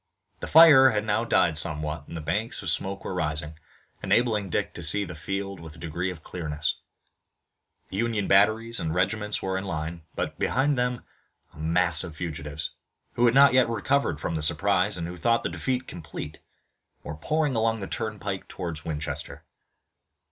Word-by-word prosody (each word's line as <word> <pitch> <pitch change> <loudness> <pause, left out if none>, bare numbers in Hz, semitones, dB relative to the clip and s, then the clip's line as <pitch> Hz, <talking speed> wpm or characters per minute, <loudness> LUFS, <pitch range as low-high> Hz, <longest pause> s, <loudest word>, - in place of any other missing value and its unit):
The - - -6
fire 150 -5 +8
had 105 -2 -1
now 110 +1 +1
died 80 -8 +3
somewhat 75 -1 -1
and 85 - -7
the - - -5
banks 105 +9 -2
of 85 - 0
smoke 100 +3 -2
were - - -3
rising, 80 -3 -2 0.4
enabling 110 -5 +1
Dick - - -1
to - - -8
see 95 +6 +3
the 90 - -8
field 95 +3 -4
with 80 -1 -11
a - - -15
degree 85 +3 -3
of 85 -4 -8
clearness. 75 -4 -3 1.2
Union 110 +1 -1
batteries 110 +4 +3
and 80 -1 -2
regiments 105 +3 0
were 95 0 -1
in - - -6
line, 85 -2 -4
but - - -4
behind 140 +3 +1
them 125 -1 -1 0.5
a - - -15
mass 85 0 +2
of 80 -3 -8
fugitives, 75 -3 -5 0.4
who 120 - +2
had 120 +1 +3
not 140 -1 +7
yet 130 -2 +4
recovered 130 - 0
from 80 - -3
the 80 - -2
surprise 100 +4 +2
and 85 - -3
who 90 +1 -7
thought 115 +7 +1
the - - -1
defeat 130 -1 -2
complete, 85 -3 -8 0.6
were 75 - -6
pouring 145 - -1
along 115 0 +1
the 100 - -5
turnpike 105 -3 -4
toward 85 -5 -5
Winchester. 75 -1 -4
95 Hz, 175 wpm, -26 LUFS, 80-115 Hz, 1.2 s, fire